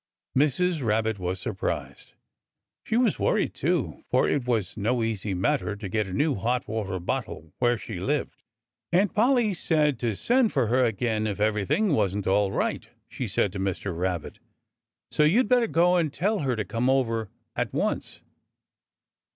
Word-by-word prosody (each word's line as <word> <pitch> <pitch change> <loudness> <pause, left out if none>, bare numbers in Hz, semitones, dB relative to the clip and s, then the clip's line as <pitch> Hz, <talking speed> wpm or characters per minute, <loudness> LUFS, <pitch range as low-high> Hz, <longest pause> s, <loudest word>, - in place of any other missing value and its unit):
Mrs. 150 +3 +2
Rabbit 110 -1 0
was 90 +1 -3
surprised. - - -4 0.7
She 225 - 0
was 240 -5 +2
worried, - - +1
too, - - -1
for - - +3
it 135 -4 0
was 110 -6 0
no 115 +3 0
easy 105 -3 -2
matter 105 +3 0
to 100 -1 -6
get 105 +1 -1
a - - -7
new 145 - +1
hot 120 +5 -1
water 105 -4 -3
bottle 80 -2 -4
where 120 -1 +3
she 110 -2 -7
lived. 135 +10 -2 0.5
"Aunt 185 +3 +3
Polly 235 -1 +3
said 150 -6 +1
to 115 -4 -1
send 245 - +2
for 130 -3 +2
her 125 +4 +2
again 110 -1 0
if 105 -1 -3
everything 110 - +1
wasn't 100 -4 0
all 100 +1 +2
right," - - -2 0.2
she - - -4
said 100 - +1
to 100 - -4
Mr. 95 -1 -2
Rabbit. 90 -2 -3 0.7
"So - - +1
you'd 200 +11 +4
better 245 -1 +3
go 180 0 +3
and 160 -4 +1
tell 205 +7 0
her 130 -5 0
to 110 -2 -2
come 115 +6 0
over 115 -5 +1 0.3
at - - -1
once." - - -2
115 Hz, 165 wpm, -26 LUFS, 100-155 Hz, 0.7 s, you'd